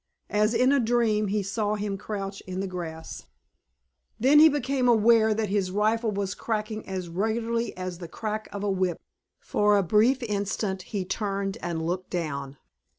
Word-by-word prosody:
As 215 Hz, +2 st, +2 dB
in 255 Hz, +3 st, +4 dB
a 280 Hz, -, +4 dB
dream 225 Hz, -3 st, +2 dB
he 205 Hz, +1 st, 0 dB
saw 210 Hz, +1 st, -1 dB
him 205 Hz, -1 st, -2 dB
crouch 195 Hz, -1 st, -5 dB
in 185 Hz, 0 st, -4 dB
the 195 Hz, -, -1 dB
grass. 165 Hz, -3 st, -7 dB, 0.9 s
Then 275 Hz, +6 st, +6 dB
he 315 Hz, +1 st, +9 dB
became 270 Hz, -3 st, 0 dB
aware 225 Hz, -1 st, +5 dB
that 215 Hz, -2 st, -1 dB
his 195 Hz, -2 st, 0 dB
rifle 215 Hz, +4 st, +1 dB
was 200 Hz, -2 st, -2 dB
cracking 215 Hz, 0 st, -3 dB
as 185 Hz, -2 st, -4 dB
regularly 225 Hz, +6 st, -1 dB
as 185 Hz, -1 st, -5 dB
the 175 Hz, -, -7 dB
crack 215 Hz, +5 st, -4 dB
of 200 Hz, 0 st, -5 dB
a 205 Hz, -, +1 dB
whip. 185 Hz, -3 st, 0 dB, 0.4 s
For 210 Hz, 0 st, +2 dB
a 200 Hz, -, +3 dB
brief 230 Hz, +8 st, +3 dB
instant 200 Hz, -2 st, -2 dB
he 200 Hz, -4 st, -2 dB
turned 200 Hz, +1 st, -2 dB
and 165 Hz, -2 st, -3 dB
looked 180 Hz, +2 st, -3 dB
down. 140 Hz, -5 st, -4 dB
210 Hz, 170 wpm, -26 LUFS, 185-225 Hz, 0.9 s, he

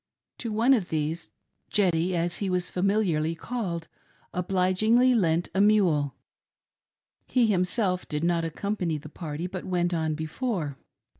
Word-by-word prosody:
To 230 Hz, -, -3 dB
one 230 Hz, +5 st, +4 dB
of 210 Hz, -9 st, +1 dB
these, 155 Hz, +1 st, -2 dB, 0.4 s
"Jdddy" 180 Hz, -3 st, +2 dB
as 175 Hz, 0 st, 0 dB
he 200 Hz, -, -2 dB
was 180 Hz, -1 st, -1 dB
familiarly 180 Hz, -5 st, +1 dB
called, 170 Hz, -5 st, -4 dB, 0.5 s
obligingly 190 Hz, +7 st, +3 dB
lent 175 Hz, -6 st, +2 dB
a 190 Hz, -, +2 dB
mule; 180 Hz, -10 st, +3 dB, 1.1 s
he 250 Hz, -2 st, +3 dB
himself 185 Hz, -1 st, +1 dB
did 150 Hz, +1 st, -3 dB
not 170 Hz, -1 st, +2 dB
accompany 170 Hz, 0 st, -2 dB
the 150 Hz, +1 st, -10 dB
party 155 Hz, 0 st, -5 dB
but 185 Hz, 0 st, -5 dB
went 175 Hz, -1 st, 0 dB
on 160 Hz, -2 st, 0 dB
before. 160 Hz, -, -3 dB
180 Hz, 135 wpm, -27 LUFS, 165-205 Hz, 1.1 s, one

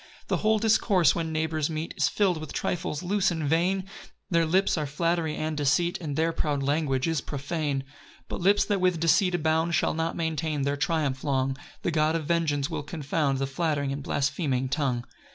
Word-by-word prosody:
2 -, -, -28 dB
The -, -, +2 dB
whole 220 Hz, 0 st, +2 dB
discourse, 210 Hz, -, +3 dB
when 165 Hz, -1 st, -2 dB
neighbours 155 Hz, -1 st, -1 dB
meet, 160 Hz, +1 st, -4 dB
Is -, -, +2 dB
fill'd 190 Hz, -6 st, +1 dB
with 155 Hz, -2 st, -7 dB
trifles 155 Hz, -2 st, -2 dB
loose 195 Hz, +2 st, +2 dB
and 165 Hz, -3 st, -2 dB
vain; 185 Hz, +5 st, +1 dB, 0.4 s
Their 170 Hz, -1 st, +3 dB
lips 190 Hz, +4 st, +2 dB
are 155 Hz, -3 st, -2 dB
flattery 165 Hz, +1 st, 0 dB
and 155 Hz, 0 st, -2 dB
deceit, 150 Hz, +5 st, +1 dB
And 150 Hz, -4 st, -4 dB
their 160 Hz, +2 st, +2 dB
proud 145 Hz, -3 st, -1 dB
language 140 Hz, -2 st, 0 dB
is 165 Hz, -4 st, 0 dB
profane. 145 Hz, 0 st, -2 dB
3 135 Hz, -, -26 dB, 0.4 s
But -, -, -5 dB
lips, 200 Hz, +3 st, +4 dB
that 200 Hz, -3 st, 0 dB
with 180 Hz, -2 st, +2 dB
deceit 175 Hz, +3 st, +3 dB
abound, 160 Hz, +1 st, +1 dB
Shall -, -, +1 dB
not 165 Hz, +1 st, -2 dB
maintain 160 Hz, -3 st, -1 dB
their 140 Hz, +1 st, 0 dB
triumph 140 Hz, -2 st, -1 dB
long; 135 Hz, -2 st, 0 dB, 0.3 s
The 175 Hz, -, 0 dB
God 155 Hz, 0 st, +2 dB
of 160 Hz, -2 st, -2 dB
vengeance 150 Hz, -4 st, +1 dB
will -, -, -3 dB
confound 145 Hz, -2 st, -1 dB
The 135 Hz, -, 0 dB
flattering 140 Hz, 0 st, -1 dB
and 140 Hz, +1 st, -4 dB
blaspheming 135 Hz, -2 st, -1 dB
tongue. 130 Hz, -4 st, -1 dB
160 Hz, 195 wpm, -27 LUFS, 145-170 Hz, 0.4 s, lips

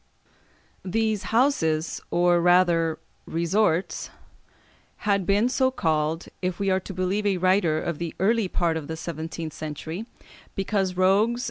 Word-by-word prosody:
These 215 Hz, +2 st, -1 dB
houses, 165 Hz, -, +1 dB
or 175 Hz, 0 st, +3 dB
rather 170 Hz, -2 st, +3 dB, 0.3 s
resorts, 170 Hz, +1 st, 0 dB, 1.0 s
had 200 Hz, -3 st, +1 dB
been 205 Hz, +4 st, +3 dB
so 260 Hz, +1 st, +2 dB
called, 160 Hz, -7 st, -1 dB, 0.2 s
if 180 Hz, -1 st, -2 dB
we 195 Hz, -1 st, +1 dB
are 190 Hz, -, +2 dB
to 190 Hz, -, -8 dB
believe 190 Hz, +3 st, 0 dB
a 195 Hz, -2 st, +1 dB
writer 185 Hz, -3 st, +2 dB
of 170 Hz, -1 st, -3 dB
the 170 Hz, -1 st, -4 dB
early 215 Hz, +2 st, +2 dB
part 170 Hz, -2 st, 0 dB
of 150 Hz, -3 st, -6 dB
the 160 Hz, -, -5 dB
seventeenth 160 Hz, -1 st, -5 dB
century, 160 Hz, +7 st, -6 dB, 0.5 s
"Because 195 Hz, -2 st, -1 dB
rogues 205 Hz, +6 st, +3 dB
180 Hz, 135 wpm, -25 LUFS, 165-200 Hz, 1.0 s, or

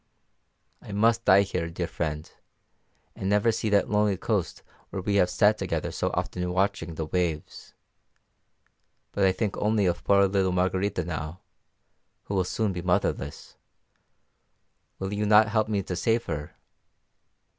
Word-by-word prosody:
I 105 Hz, -, -9 dB
must 115 Hz, +3 st, +2 dB
die 95 Hz, +1 st, +6 dB
here, 85 Hz, -4 st, -3 dB
dear 85 Hz, +1 st, -3 dB
friend, 80 Hz, -2 st, -4 dB, 0.9 s
and 95 Hz, -, -3 dB
never 105 Hz, +3 st, +3 dB
see 110 Hz, 0 st, -2 dB
that 100 Hz, -1 st, +3 dB
lonely 105 Hz, -2 st, +2 dB
coast -, -, -2 dB, 0.3 s
where 100 Hz, -, -5 dB
we 100 Hz, 0 st, +1 dB
have 90 Hz, -2 st, +3 dB
sat 105 Hz, +2 st, +3 dB
together -, -, -2 dB
so -, -, -1 dB
often 90 Hz, 0 st, -2 dB
watching 95 Hz, -3 st, -1 dB
the 80 Hz, -, -3 dB
waves. 80 Hz, -2 st, -3 dB, 1.4 s
But 100 Hz, -, +1 dB
I 95 Hz, -, +5 dB
think 100 Hz, +2 st, -2 dB
only 105 Hz, -1 st, +1 dB
of 85 Hz, -1 st, -1 dB
poor 100 Hz, 0 st, +4 dB
little 95 Hz, -1 st, +1 dB
Margarita 95 Hz, 0 st, 0 dB
now, 80 Hz, +1 st, -5 dB, 0.8 s
who -, -, -6 dB
will 95 Hz, -2 st, +1 dB
soon 105 Hz, +1 st, -1 dB
be 90 Hz, -, -4 dB
motherless: 85 Hz, -5 st, -2 dB, 1.4 s
will 95 Hz, +1 st, -4 dB
you 105 Hz, +1 st, -1 dB
not 105 Hz, 0 st, +6 dB
help 110 Hz, 0 st, +1 dB
me 100 Hz, -2 st, 0 dB
to 90 Hz, -, -4 dB
save 115 Hz, +6 st, +1 dB
her? 75 Hz, -2 st, -5 dB
95 Hz, 150 wpm, -26 LUFS, 90-105 Hz, 1.4 s, die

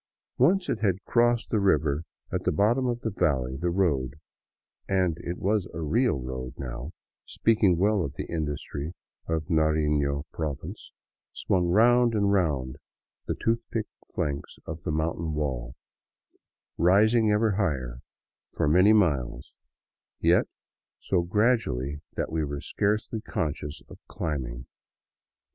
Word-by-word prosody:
Once 180 Hz, +8 st, +4 dB
it 110 Hz, -, -1 dB
had 95 Hz, -4 st, 0 dB
crossed 120 Hz, 0 st, +2 dB
the 110 Hz, -, +2 dB
river 75 Hz, -6 st, +2 dB, 0.3 s
at -, -, -2 dB
the -, -, +2 dB
bottom 115 Hz, -, +2 dB
of 120 Hz, -1 st, -2 dB
the 110 Hz, -, -2 dB
valley, 65 Hz, -9 st, 0 dB
the 85 Hz, +6 st, -1 dB
road 75 Hz, -8 st, +1 dB, 0.4 s
— -, -, -44 dB
and 85 Hz, -3 st, +1 dB
it 85 Hz, +1 st, -4 dB
was 100 Hz, -1 st, 0 dB
a -, -, -4 dB
real 105 Hz, -, +1 dB
road 65 Hz, 0 st, -6 dB
now, 65 Hz, +1 st, -5 dB, 0.3 s
speaking 105 Hz, -6 st, +2 dB
well 100 Hz, +1 st, +2 dB
of 70 Hz, -2 st, -5 dB
the -, -, -4 dB
industry 75 Hz, 0 st, -4 dB, 0.3 s
of 80 Hz, -2 st, -1 dB
Narifio 75 Hz, -3 st, +1 dB
province 75 Hz, -4 st, -5 dB, 0.2 s
— -, -, -67 dB
swung 90 Hz, -2 st, 0 dB
round 120 Hz, +5 st, +4 dB
and 100 Hz, -1 st, +2 dB
round 70 Hz, -9 st, 0 dB, 0.5 s
the -, -, -1 dB
toothlike 115 Hz, -1 st, -1 dB, 0.3 s
flanks 70 Hz, -1 st, -3 dB
of 80 Hz, 0 st, -6 dB
the 80 Hz, -, -3 dB
mountain 80 Hz, +1 st, -1 dB
wall, 65 Hz, -5 st, -3 dB, 1.0 s
rising 110 Hz, +5 st, +4 dB
ever 105 Hz, +1 st, +3 dB
higher 65 Hz, -, -1 dB, 0.5 s
for -, -, 0 dB
many 90 Hz, +8 st, +6 dB
miles, 75 Hz, -, +1 dB, 0.7 s
yet -, -, +4 dB, 0.5 s
so 90 Hz, -3 st, 0 dB
gradually 85 Hz, -, +1 dB
that -, -, -2 dB
we 80 Hz, -1 st, 0 dB
were 70 Hz, -1 st, -3 dB
scarcely 105 Hz, +6 st, -1 dB
conscious 75 Hz, -5 st, -4 dB
of -, -, -13 dB
climbing. 65 Hz, -6 st, -4 dB
85 Hz, 135 wpm, -27 LUFS, 70-105 Hz, 1.0 s, many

